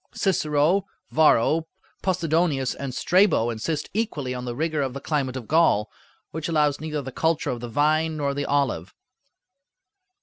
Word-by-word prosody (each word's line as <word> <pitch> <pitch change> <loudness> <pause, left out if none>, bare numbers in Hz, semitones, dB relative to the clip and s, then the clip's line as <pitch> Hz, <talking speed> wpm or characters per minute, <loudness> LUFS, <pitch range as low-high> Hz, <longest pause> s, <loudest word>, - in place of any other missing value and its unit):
Cicero, 165 +1 +1 0.2
Varro, 160 +1 +3 0.3
Possidonius, 165 -7 +1
and 140 -2 -5
Strabo 165 - +3
insist 145 +7 -3
equally 155 - -2
on 125 0 -5
the 120 -1 -4
rigor 155 +1 -1
of 135 -2 -2
the - - -4
climate 140 -3 -2
of 125 -4 -6
Gaul, 155 -10 +3 0.4
which 160 +1 -4
allows 150 -3 +1
neither 155 -2 -3
the 130 - -6
culture 160 +3 0
of 120 - -4
the 120 0 -6
vine 155 +5 +1
nor 140 -2 -1
the 145 0 -2
olive. 130 - -1
150 Hz, 155 wpm, -24 LUFS, 130-160 Hz, 0.4 s, Varro